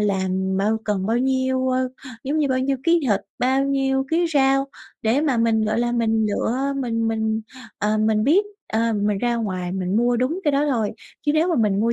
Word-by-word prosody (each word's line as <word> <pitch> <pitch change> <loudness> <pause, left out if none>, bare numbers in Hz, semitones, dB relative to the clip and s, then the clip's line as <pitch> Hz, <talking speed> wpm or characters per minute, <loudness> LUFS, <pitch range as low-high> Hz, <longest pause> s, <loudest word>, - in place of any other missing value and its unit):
làm 190 -1 0
bao 210 +3 +1
cần 200 -2 -1
bao 230 +2 +1
nhiêu, 260 0 0
ơ, 255 0 0 0.4
giống 295 +4 -1
như, 290 -2 +1
bao 260 0 +1
nhiêu 270 +1 0
ký 335 0 +4
thịt, 200 - +2 0.2
bao 265 +2 +2
nhiêu 270 -1 0
ký 340 +1 +2
rau, 270 0 +3 0.4
để 230 +6 +2
mà 280 -6 +1
mình, 225 -1 +2
gọi 215 +2 0
là, 240 0 0
mình 225 -2 +1
lựa, 260 +7 -1
mình 230 -4 -1
mình, 220 0 -1 0.4
ờ, 210 +1 0
mình 215 0 +2
biết, 370 +9 +4 0.3
ờ, 225 +1 +1
mình 205 -1 0
ra 240 +1 0
ngoài 185 -5 -3
mình 190 +1 -1
mua 240 +1 +2
đúng 280 +10 -1
cái 295 - +2
đó 285 +2 +2
thôi. 220 -5 0 0.4
Chứ 295 - +3
nếu 320 +3 +2
mà 340 - +1
mình 210 -3 +2
mua 230 +1 +2
235 Hz, 215 wpm, -22 LUFS, 215-270 Hz, 0.4 s, ký